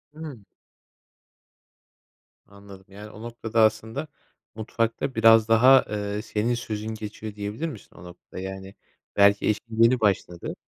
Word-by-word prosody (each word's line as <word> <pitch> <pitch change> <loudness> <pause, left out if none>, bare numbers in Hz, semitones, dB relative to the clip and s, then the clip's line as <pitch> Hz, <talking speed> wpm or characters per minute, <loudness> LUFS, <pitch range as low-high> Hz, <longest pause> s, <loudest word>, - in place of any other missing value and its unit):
Imm. 150 -9 -9 2.0
Anladım. 100 -1 -15
Yani, 105 +2 -11
o 105 - -13
noktada 115 -1 -2
aslında 110 +6 0 0.5
mutfakta 115 +4 -2
biraz 115 -1 +6
daha, 125 +4 +6
eee, 105 0 -3
senin 110 +1 -1
sözün 110 -2 -5
geçiyor 105 0 -8
diyebilir 105 +9 -4
misin 115 - -12
o - - -13
noktada? 90 +1 -12
Yani, 95 0 -8 0.4
belki 100 0 +4
eşin 110 +1 0
yeni 120 +2 +4
başladı. 95 -5 -1
110 Hz, 125 wpm, -25 LUFS, 100-115 Hz, 2.0 s, biraz